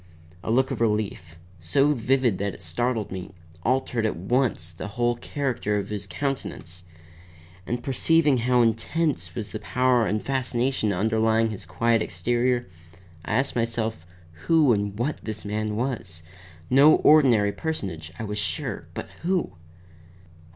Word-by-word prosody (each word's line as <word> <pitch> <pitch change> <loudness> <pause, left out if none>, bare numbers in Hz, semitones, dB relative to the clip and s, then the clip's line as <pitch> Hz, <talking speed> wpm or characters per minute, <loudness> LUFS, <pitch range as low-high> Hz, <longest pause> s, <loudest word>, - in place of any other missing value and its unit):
A - - -5
look 130 +3 +2
of - - -3
relief, 105 -7 -1 0.2
so 135 - +2
vivid 125 -4 +1
that 100 -1 -2
it - - -14
startled 110 +6 -1
me, 95 0 -7 0.3
altered 125 +1 0
at 110 - 0
once 100 -2 0
the 85 - -7
whole 120 0 +2
character 120 -5 -2
of 100 - -3
his 100 -2 -4
countenance; 125 - -4 0.9
and 120 0 -2
perceiving 145 +1 +3
how 125 +1 +3
intense 115 - 0
was 110 -3 -5
the 110 - -4
power 125 -2 +2
and 105 - 0
fascination 130 -3 0
underlying 110 +3 +2
his 95 -4 -8
quiet 115 +6 +2
exterior, 120 +7 0 0.6
I - - -2
asked 135 +2 0
myself 115 -6 -2 0.4
who 155 -6 +5
and 100 -1 -2
what 130 +7 -2
this 110 -1 -5
man 105 +1 -2
was; 105 -9 -3 0.4
no 140 +4 +7
ordinary 125 -9 +5
personage, 95 - -4
I - - -5
was 105 -1 -3
sure, 105 - -3
but - - -5
who? 180 - 0
115 Hz, 145 wpm, -25 LUFS, 100-130 Hz, 0.9 s, no